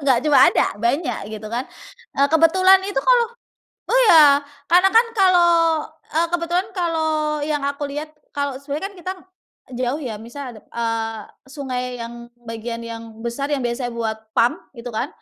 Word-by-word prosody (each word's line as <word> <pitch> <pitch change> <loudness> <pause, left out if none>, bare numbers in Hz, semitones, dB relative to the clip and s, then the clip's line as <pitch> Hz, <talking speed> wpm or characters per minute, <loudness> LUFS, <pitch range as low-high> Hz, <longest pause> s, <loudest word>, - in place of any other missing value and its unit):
enggak 265 -3 +3
cuma 295 -2 +5
ada, - - +1
banyak 280 +8 0
gitu 215 0 -7
kan. 240 +4 -3 0.5
Eee, 280 +1 +4
kebetulan 370 +4 +5
itu 400 +1 -2
kalau - - +4 0.7
oh - - +4
ya 290 -3 +7 0.3
karena 365 +2 +6
kan 465 +1 +6
kalau 365 -2 +5 0.6
eee, 330 +2 +1
kebetulan 350 +2 0
kalau 330 -3 0 0.4
yang 295 -2 -1
aku 280 +1 -3
lihat 300 +2 -5 0.2
kalau 285 -2 -2
sebenarnya 285 +5 -5
kan 395 - -17
kita 370 +2 -4 0.7
jauh 255 +4 -1
ya 240 -5 -4
misal 240 +6 -9
ada, 215 -3 -13
eee, 225 -1 -2 0.3
sungai 265 -2 -4 0.2
yang 230 +1 -7 0.3
bagian 230 0 -6
yang 230 0 -7 0.2
besar 240 +4 -3
yang 270 - -3
biasanya 240 0 -3
buat 220 -2 -2 0.2
PAM 235 +2 +4 0.3
itu 240 +1 -6
kan 230 +5 -2
280 Hz, 160 wpm, -21 LUFS, 235-335 Hz, 0.7 s, ya